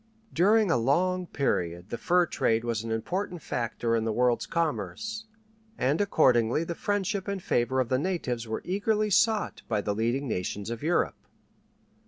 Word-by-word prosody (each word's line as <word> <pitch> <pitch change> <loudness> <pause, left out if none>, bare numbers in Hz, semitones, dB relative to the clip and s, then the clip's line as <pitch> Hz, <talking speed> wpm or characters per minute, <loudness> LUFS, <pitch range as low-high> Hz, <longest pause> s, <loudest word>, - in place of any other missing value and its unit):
During 205 +2 +4
a - - +3
long 180 +9 +1
period 90 - -2
the 120 - -2
fur 180 0 +3
trade 115 -7 0
was 115 -2 -2
an 115 - -5
important 175 - -3
factor 115 -1 -1
in 115 - 0
the 115 - 0
world's 120 +1 +1
commerce, 220 +7 -2 0.5
and 140 +8 +1
accordingly 125 - +3
the 170 - -4
friendship 205 +2 -2
and 200 -1 -2
favor 130 -5 0
of 125 -3 0
the 130 - +2
natives 130 -10 -2
were 110 - -4
eagerly 210 +3 0
sought 215 +1 +2
by 105 - 0
the 105 0 -1
leading 120 +6 -1
nations 100 +1 -3
of 120 - -5
Europe. 165 +4 0
140 Hz, 165 wpm, -28 LUFS, 115-190 Hz, 0.5 s, During